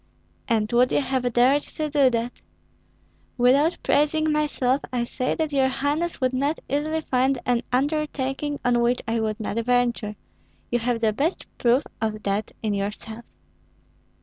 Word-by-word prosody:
"And 215 -3 +1
would 245 +1 +4
you - - +3
have 260 -3 -1
dared 255 +5 +4
to 310 +1 -4
do 285 -3 +4
that?" 235 0 -3 1.0
"Without 275 +7 +4
praising 310 +1 +2
myself 290 -3 +1
I 245 -2 0
say 255 +2 -2
that 315 -2 -1
your 270 -2 +3
highness 290 +6 -1
would 255 -1 +1
not 280 +5 0
easily 305 +3 -1
find 265 -1 +1
an 245 -1 +2
undertaking 290 +1 -1
on 245 -1 +3
which 240 +1 +1
I 225 0 0
would 215 -1 -2
not 220 +1 -2
venture; 240 -3 +1 0.6
you 240 - +2
have 235 0 -1
the 220 -2 +2
best 300 - -1
proof 245 +3 +3 0.2
of 215 -1 -2
that 200 +1 -1
in 215 -2 0
yourself." 210 +3 -4
255 Hz, 155 wpm, -24 LUFS, 235-290 Hz, 1.0 s, would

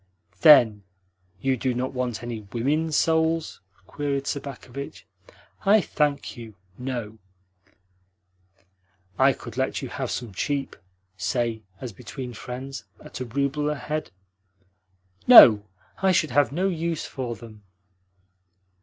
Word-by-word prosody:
"Then 120 -9 +7 0.6
you 135 -1 +1
do 125 0 -1
not 130 +2 -2
want 125 -3 -3
any 120 -2 -5
WOMEN 150 +7 0
souls?" 160 -1 +1 0.2
queried 140 +3 -3
Sobakevitch. 140 -1 -6 0.6
"I 210 +3 +6
thank 150 -6 -1
you, 115 -4 -10 0.2
no." 120 -3 -5 2.0
"I 135 +1 +6
could 120 -2 -11
let 130 +1 -1
you 130 - -5
have 130 -1 -4
some 120 -5 -5
cheap 140 +7 -2 0.4
say, 115 +3 -1 0.2
as 125 -4 -7
between 125 +3 -8
friends, 130 +4 -7
at - - -10
a 130 - -3
rouble 140 +4 -1
a 150 - -1
head?" 150 0 -4 1.2
"No, 105 -2 +10 0.3
I 190 0 +4
should 155 -4 +1
have 135 -1 +3
no 180 +6 0
use 170 -3 -2
for 125 -3 -5
them." 110 -2 -13
130 Hz, 120 wpm, -25 LUFS, 120-145 Hz, 2.0 s, No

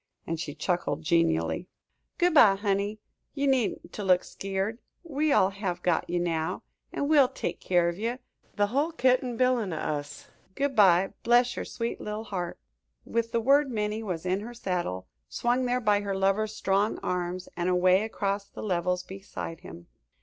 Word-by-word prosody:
and 165 -1 -3
she 150 -3 -5
chuckled 160 -2 -1
genially. 165 - +1 0.5
"Good 355 -1 +3
by, 215 -10 +7
honey. 200 +1 -1 0.4
Ye 280 -1 0
needn't 260 -5 0
to 210 - -5
look 185 -2 +4
skeered. 195 +4 -3 0.2
We 305 -2 0
all 195 -8 +4
have 190 -3 -4
got 175 -3 +1
ye 175 - 0
now, 170 0 -1 0.3
an' 285 - -2
we'll 290 -4 +6
take - - -4
keer 175 -2 +2
of 170 +2 -6
ye 230 +3 -1 0.4
the 205 - +3
hull 280 +10 0
kit 255 -4 +3
an' 245 -2 -4
bilin' 250 -6 +2
o' - - -3
us. 145 -1 -4 0.3
Good 280 -1 -1
by, 190 -3 +5
bless 240 +1 +3
your - - -4
sweet 230 0 -4
little 210 +1 -4
heart!" 180 -5 -4 0.5
With 230 0 -1
the 235 - +1
word 280 +3 +4
Minnie 215 -2 -2
was 185 -6 -4
in 185 +1 +1
her 235 +4 -8
saddle, 175 - -3 0.2
swung 245 +1 0
there 250 +1 +1
by 210 -3 +2
her 200 -1 -2
lover's 195 +3 +1
strong 200 +2 +1
arms, 180 0 -2
and 175 +1 -1
away 185 +1 +4
across 200 -2 -2
the - - -9
levels 180 -2 0
beside 190 -3 -7
him. 85 - -11
200 Hz, 180 wpm, -28 LUFS, 180-235 Hz, 0.5 s, by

